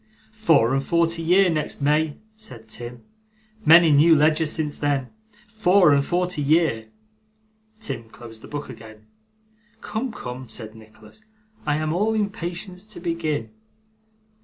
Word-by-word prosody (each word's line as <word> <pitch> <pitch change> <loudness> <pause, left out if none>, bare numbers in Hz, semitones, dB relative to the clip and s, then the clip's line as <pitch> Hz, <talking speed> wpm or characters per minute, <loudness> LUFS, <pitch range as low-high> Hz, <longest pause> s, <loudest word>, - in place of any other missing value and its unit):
'Four 165 - +3
and 135 0 0
forty 170 +2 +1
year, 185 +4 +4
next 155 -2 -2
May!' 150 +1 +1 0.2
said 125 - -11
Tim. 120 +2 -8 0.6
'Many 165 -1 +7
new 155 +3 +6
ledgers 155 +1 +2
since 150 -2 -2
then. 140 -3 -1 0.4
Four 195 -6 +4
and 140 0 +3
forty 180 0 -1
year!' 145 -7 +1 0.9
Tim 130 - -6
closed 115 -1 -13
the - - -12
book 145 0 -6
again. 110 -1 -12 0.8
'Come, 240 +3 -4
come,' 125 - -8
said 110 -1 -6
Nicholas, 110 - -16 0.4
'I 145 - +2
am 155 +1 -1
all 215 +5 +1
impatience 185 -3 -4
to 210 -4 -9
begin. 160 -9 -3
155 Hz, 135 wpm, -23 LUFS, 125-175 Hz, 0.9 s, Many